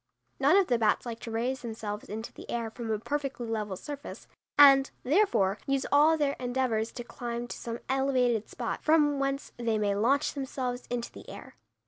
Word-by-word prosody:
None 285 +7 +5
of 395 - +5
the 240 -6 +1
bats 220 +2 +2
like 230 -1 -5
to 230 - -7
raise 240 +4 -2
themselves 220 -3 -6
into 220 +2 -6
the - - -12
air 230 -2 -2
from 230 0 -6
a 215 - +1
perfectly 275 +1 -3
level 210 -3 -2
surface, 285 +7 -8 0.3
and, 275 -1 +8
therefore, 255 - +2
use 275 -1 +1
all 305 +3 +5
their 285 -2 +1
endeavors 245 -3 -1
to 240 - -6
climb 235 0 -5
to 240 - -7
some 230 0 -5
elevated 255 -4 +1
spot, - - -4
from 295 -2 +3
whence 275 0 -2
they 230 -2 0
may 205 -1 +1
launch 260 +9 +2
themselves 255 -3 -4
into 240 -1 -3
the - - -12
air. - - -10
245 Hz, 185 wpm, -29 LUFS, 225-275 Hz, 0.3 s, and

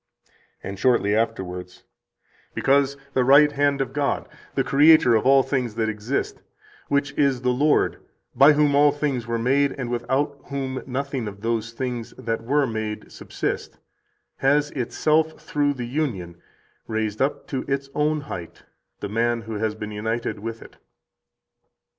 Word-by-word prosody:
80 - - -8
And 100 0 -7
shortly 105 -4 +3
afterwards: 90 -5 -3 0.7
"Because 140 0 +2 0.2
the 130 - +3
right 145 +3 +6
hand 140 -1 +1
of 135 -1 -3
God, 145 -1 -1 0.3
the - - +2
Creator 145 -3 +6
of 110 +2 +2
all 135 0 +6
things 130 -5 -2
that 110 -1 0
exist, 110 +6 -3 0.5
which 140 0 0
is 135 -4 +2
the 125 - +2
Lord, 145 +4 +2 0.3
by 145 +2 +7
whom 145 -1 +3
all 145 +1 +5
things 140 -5 -2
were 115 0 -1
made, 135 +4 +2
and 125 -3 -5
without 140 +4 -1
whom 135 -2 -4
nothing 135 -2 -3
of 100 -1 -8
those 115 0 -1
things 120 -2 -4
that 115 -2 -3
were 140 +4 +2
made 110 -3 -4
subsist, - - -4 0.6
has 145 +2 +2
itself, 155 +5 0
through 145 -1 0
the 125 -2 -4
union, 115 - -3 0.5
raised 110 -1 -2
up 135 +2 0
to 130 -2 -2
its 135 0 -2
own 150 0 +1
height 90 - -8 0.4
the - - -3
man 115 +2 0
who 110 -2 -6
has 110 -1 -1
been 105 0 -6
united 110 +1 -3
with 115 +1 -6
it." - - -16
130 Hz, 155 wpm, -23 LUFS, 115-140 Hz, 0.7 s, by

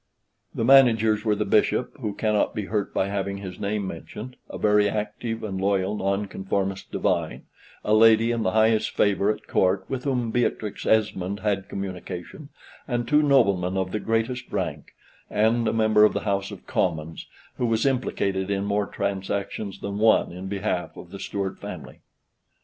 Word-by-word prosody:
The 115 - 0
managers 115 -5 +5
were 105 -2 +2
the 105 - -1
Bishop, 110 +4 +1
who 105 -5 -3
cannot 105 -1 +1
be 105 - -2
hurt 105 -1 -2
by 95 - 0
having 100 0 -2
his 95 -2 -8
name 100 0 -2
mentioned, 105 +8 -8
a - - -6
very 105 -1 +3
active 105 +2 -4
and 95 -3 -3
loyal 100 +1 +1
Nonconformist 95 0 -2
Divine, - - -1 0.4
a 105 - +2
lady 115 +1 +6
in 115 -1 -1
the 95 -2 0
highest 110 0 +3
favor 100 0 +2
at - - -7
Court, 95 0 +1
with 130 -1 -4
whom 125 -4 0
Beatrix 110 -3 -1
Esmond 100 -2 +1
had 100 -2 -1
communication, 95 - -6 0.4
and 120 -3 -1
two 150 +2 +4
noblemen 100 -11 +3
of 95 -1 -1
the 105 - -1
greatest 115 +3 -2
rank, - - -4 0.4
and 110 +2 +2
a - - +2
member 110 -1 +4
of 105 - +5
the - - -2
House 100 -1 -1
of - - -10
Commons, 80 -3 -2 0.3
who 125 - +1
was 115 +1 +1
implicated 100 -7 0
in 100 0 -1
more 100 0 0
transactions 100 0 -3
than 100 +1 -4
one 110 -4 +4
in 90 +2 -7
behalf 95 -2 -3
of 90 - -11
the 100 - -8
Stuart 100 -1 -4
family. - - -8
105 Hz, 170 wpm, -25 LUFS, 95-110 Hz, 0.4 s, lady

